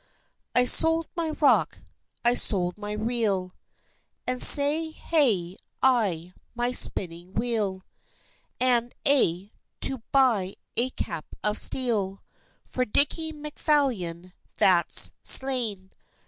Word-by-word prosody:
I 250 Hz, -, +4 dB
sold 325 Hz, +5 st, +5 dB
my 335 Hz, -2 st, -2 dB
rock, 195 Hz, -, +2 dB, 0.4 s
I 240 Hz, -, +5 dB
sold 185 Hz, -5 st, +1 dB
my 210 Hz, 0 st, -6 dB
reel, 210 Hz, -4 st, -2 dB, 0.7 s
And 250 Hz, 0 st, -1 dB
sae 295 Hz, +3 st, +4 dB
hae 225 Hz, -, -1 dB, 0.3 s
I 195 Hz, -10 st, +1 dB, 0.2 s
my 240 Hz, +1 st, -1 dB
spinning 175 Hz, -6 st, -1 dB
wheel, 215 Hz, -5 st, -2 dB, 0.8 s
And 245 Hz, -1 st, +1 dB
a' 200 Hz, -8 st, +1 dB, 0.3 s
to 265 Hz, -3 st, +1 dB
buy 230 Hz, -9 st, +1 dB, 0.2 s
a 245 Hz, +2 st, 0 dB
cap 160 Hz, -10 st, -6 dB, 0.2 s
of 210 Hz, 0 st, 0 dB
steel 210 Hz, -7 st, -1 dB, 0.4 s
For 255 Hz, -, -2 dB
Dickie 295 Hz, +7 st, +1 dB
Macphalion 270 Hz, -, -2 dB, 0.2 s
that's 180 Hz, -3 st, +3 dB
slain! 230 Hz, -8 st, +2 dB
235 Hz, 105 wpm, -25 LUFS, 190-265 Hz, 0.8 s, sold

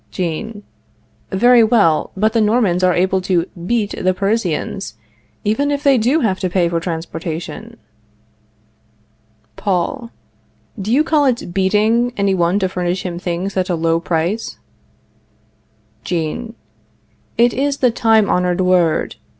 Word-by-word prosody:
Jean. 200 Hz, +5 st, -4 dB, 0.7 s
Very 240 Hz, +4 st, +5 dB
well; 210 Hz, -9 st, +3 dB
but 215 Hz, +2 st, +1 dB
the 230 Hz, -, +2 dB
Normans 210 Hz, -5 st, +2 dB
are 180 Hz, -1 st, +3 dB
able 190 Hz, +1 st, +1 dB
to 180 Hz, -2 st, 0 dB, 0.2 s
beat 225 Hz, -3 st, 0 dB
the 185 Hz, 0 st, +2 dB
Parisians, 205 Hz, +5 st, -2 dB, 0.5 s
even 245 Hz, +8 st, 0 dB
if 285 Hz, 0 st, -2 dB
they 275 Hz, -3 st, +4 dB
do 260 Hz, +9 st, +2 dB
have 190 Hz, -6 st, 0 dB
to 185 Hz, -, -1 dB
pay 175 Hz, -1 st, +1 dB
for 170 Hz, 0 st, -1 dB
transportation. 165 Hz, +6 st, -6 dB, 1.8 s
Paul. 215 Hz, +6 st, -2 dB, 0.7 s
Do 205 Hz, +3 st, -3 dB
you 280 Hz, +5 st, +4 dB
call 305 Hz, -2 st, +2 dB
it 240 Hz, -9 st, -1 dB
beating 215 Hz, +6 st, +2 dB
any 200 Hz, -1 st, +1 dB
one 175 Hz, +1 st, +1 dB
to 190 Hz, -2 st, +1 dB
furnish 180 Hz, 0 st, -2 dB
him 175 Hz, -1 st, -4 dB
things 180 Hz, +2 st, -3 dB
at 185 Hz, -1 st, -1 dB
a 175 Hz, -, +1 dB
low 165 Hz, 0 st, +1 dB
price? 170 Hz, +6 st, -2 dB, 1.5 s
Jean. 180 Hz, +8 st, -3 dB, 0.8 s
It 240 Hz, +1 st, +4 dB
is 280 Hz, +1 st, -1 dB
the 250 Hz, -3 st, +2 dB
time 225 Hz, -2 st, +3 dB
honored 180 Hz, 0 st, +1 dB
word. 180 Hz, -3 st, +1 dB
195 Hz, 135 wpm, -18 LUFS, 175-230 Hz, 1.8 s, Very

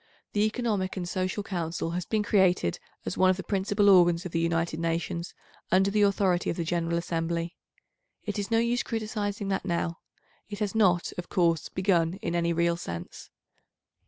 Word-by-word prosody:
The 210 Hz, +1 st, +3 dB
Economic 210 Hz, -5 st, -1 dB
and 175 Hz, -2 st, -3 dB
Social 185 Hz, +3 st, -2 dB
Council 170 Hz, -3 st, -3 dB
has 175 Hz, +1 st, -3 dB
been 215 Hz, -1 st, +1 dB
created 185 Hz, -, +2 dB, 0.3 s
as -, -, -4 dB
one 185 Hz, -, +6 dB
of 185 Hz, -, +2 dB
the 190 Hz, -, -5 dB
principal 205 Hz, +1 st, +1 dB
organs 175 Hz, -2 st, +5 dB
of 180 Hz, -, -5 dB
the 165 Hz, -, 0 dB
United 165 Hz, -1 st, 0 dB
Nations, 170 Hz, +1 st, -2 dB, 0.4 s
under 190 Hz, +2 st, +4 dB
the 210 Hz, +1 st, +2 dB
authority 195 Hz, -3 st, +2 dB
of -, -, -2 dB
the 170 Hz, -, -1 dB
General 170 Hz, 0 st, -1 dB
Assembly. 170 Hz, 0 st, -2 dB, 0.7 s
It 205 Hz, -1 st, -3 dB
is 200 Hz, -, -3 dB
no 225 Hz, -, +3 dB
use 235 Hz, +1 st, +2 dB
criticising 210 Hz, -2 st, -3 dB
that 195 Hz, -, -1 dB
now; 170 Hz, -2 st, -2 dB, 0.5 s
it 205 Hz, -, -5 dB
has 210 Hz, -2 st, -2 dB
not, 185 Hz, -6 st, +2 dB
of 175 Hz, -, -6 dB
course, 170 Hz, -3 st, +1 dB
begun 180 Hz, -3 st, +1 dB
in -, -, -1 dB
any 170 Hz, 0 st, +1 dB
real 170 Hz, 0 st, +1 dB
sense. 85 Hz, -, -7 dB
180 Hz, 180 wpm, -28 LUFS, 170-205 Hz, 0.7 s, one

